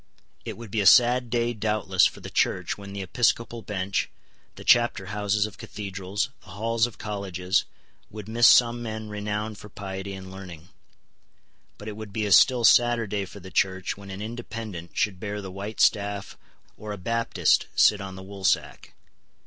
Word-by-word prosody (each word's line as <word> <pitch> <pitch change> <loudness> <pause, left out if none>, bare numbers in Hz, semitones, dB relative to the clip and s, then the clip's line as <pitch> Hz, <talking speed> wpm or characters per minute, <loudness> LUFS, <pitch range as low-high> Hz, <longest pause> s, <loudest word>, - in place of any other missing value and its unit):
It - - -6
would 115 -3 -10
be 110 - 0
a 100 - +3
sad 125 +2 +6
day 120 0 0
doubtless 105 -4 +2
for - - -11
the - - -8
Church - - 0
when 100 -1 -10
the 100 -1 -5
episcopal 115 +4 0
bench, 100 -2 -2 0.5
the - - -10
chapter 120 -5 +4
houses 105 0 +1
of 105 -4 -9
cathedrals, 100 -1 -4
the - - -22
halls 115 +3 +1
of 115 - -13
colleges, 95 -3 -1 0.4
would 105 -1 -9
miss 115 +1 +5
some 120 -1 +5
men 110 -2 -5
renowned 105 +1 -4
for 105 - -11
piety 95 -1 -6
and 95 -1 -9
learning. 90 -3 -10 1.1
But 105 - -10
it 105 - -5
would 110 -1 -8
be 110 +1 -2
a 100 - -2
still 120 +6 +6
sadder 120 0 +5
day 100 -1 -2
for 100 - -11
the 95 +1 -11
Church 95 0 0
when 100 0 -12
an 95 +2 -6
Independent 110 -6 -7
should 95 -3 0
bear 105 +1 -4
the 95 -2 -7
white 100 +3 -7
staff 100 -2 +1 0.4
or 105 0 -7
a - - -6
Baptist 115 +5 +1
sit 105 -1 +5
on 95 -1 -7
the 95 - -9
woolsack. 95 -1 -2
105 Hz, 180 wpm, -26 LUFS, 95-110 Hz, 1.1 s, sad